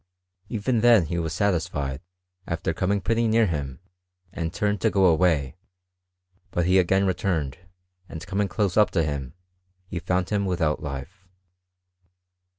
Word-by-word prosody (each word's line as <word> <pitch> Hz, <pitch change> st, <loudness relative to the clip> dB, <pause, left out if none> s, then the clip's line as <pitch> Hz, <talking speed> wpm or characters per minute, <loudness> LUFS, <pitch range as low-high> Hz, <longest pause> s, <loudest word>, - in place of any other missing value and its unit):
Even 115 Hz, +2 st, 0 dB
then 115 Hz, -6 st, +6 dB
he 85 Hz, +2 st, -2 dB
was 80 Hz, -1 st, -2 dB
satisfied, 80 Hz, -7 st, -1 dB, 0.5 s
after 85 Hz, 0 st, -2 dB
coming 95 Hz, +4 st, 0 dB
pretty 115 Hz, +3 st, +1 dB
near 110 Hz, +1 st, +4 dB
him, 70 Hz, -, -3 dB, 0.5 s
and 80 Hz, -1 st, -3 dB
turned 105 Hz, 0 st, -1 dB
to 110 Hz, -, +3 dB
go 95 Hz, -2 st, +3 dB
away; 80 Hz, -4 st, +2 dB, 0.9 s
but 85 Hz, -1 st, -1 dB
he 95 Hz, +1 st, +5 dB
agani 95 Hz, +3 st, +2 dB
returned, 85 Hz, -7 st, -1 dB, 0.5 s
and 80 Hz, -1 st, -7 dB
coming 100 Hz, +1 st, -1 dB
close 95 Hz, 0 st, -1 dB
up 105 Hz, -1 st, +5 dB
to 85 Hz, -, +1 dB
him, 70 Hz, -3 st, -4 dB, 0.5 s
he 90 Hz, -1 st, -5 dB
found 90 Hz, +2 st, -1 dB
him 100 Hz, -1 st, +1 dB
without 85 Hz, -4 st, 0 dB
life. 75 Hz, +7 st, -7 dB
90 Hz, 145 wpm, -25 LUFS, 80-100 Hz, 0.9 s, then